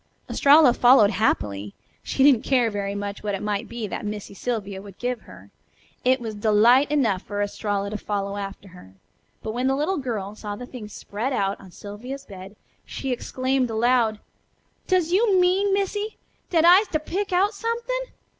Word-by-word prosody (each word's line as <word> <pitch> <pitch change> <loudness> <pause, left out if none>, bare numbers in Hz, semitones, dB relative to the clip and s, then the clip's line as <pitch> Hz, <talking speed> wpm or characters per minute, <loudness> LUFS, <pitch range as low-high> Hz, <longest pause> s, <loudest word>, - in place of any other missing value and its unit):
Estralla 285 -2 +6
followed 245 -4 +6
happily. 105 - -1 0.3
She 265 - 0
didn't 270 -5 +6
care 245 -4 +2
very 200 -1 -3
much 200 0 -5
what 205 -1 -2
it 195 - -6
might 205 -1 -2
be 235 -2 -4
that 200 - -5
Missy 210 -1 -5
Sylvia 200 -3 -4
would 200 -1 -13
give 245 -2 -3
her, - - -15 0.5
it 255 +1 +3
was 225 -2 -5
delight 225 +6 +4
enough 245 -11 +1
for 205 0 -6
Estralla 205 0 -2
to 215 - -4
follow 200 -1 -3
after 195 0 -7
her. 95 - -15 0.5
But 220 - -3
when 250 +3 -1
the 270 - +2
little 305 +7 0
girl 215 -7 -4
saw 210 -1 -6
the 245 - -8
things 230 -4 -9
spread 220 +7 -4
out 195 -3 -1
on 190 - -13
Sylvia's 235 +9 -8
bed 195 +1 -11 0.3
she 270 - -5
exclaimed 255 +1 -1
aloud: 225 -1 +2 0.7
"Does 360 -3 +2
you 395 0 +3
mean, 375 +3 +3
Missy, 410 +2 -1 0.3
dat 330 -2 +3
I'se 370 +5 +7
to 310 - +2
pick 385 +6 -3
out 390 +4 +2
somethin'? 470 +3 -3
235 Hz, 175 wpm, -24 LUFS, 205-290 Hz, 0.7 s, I'se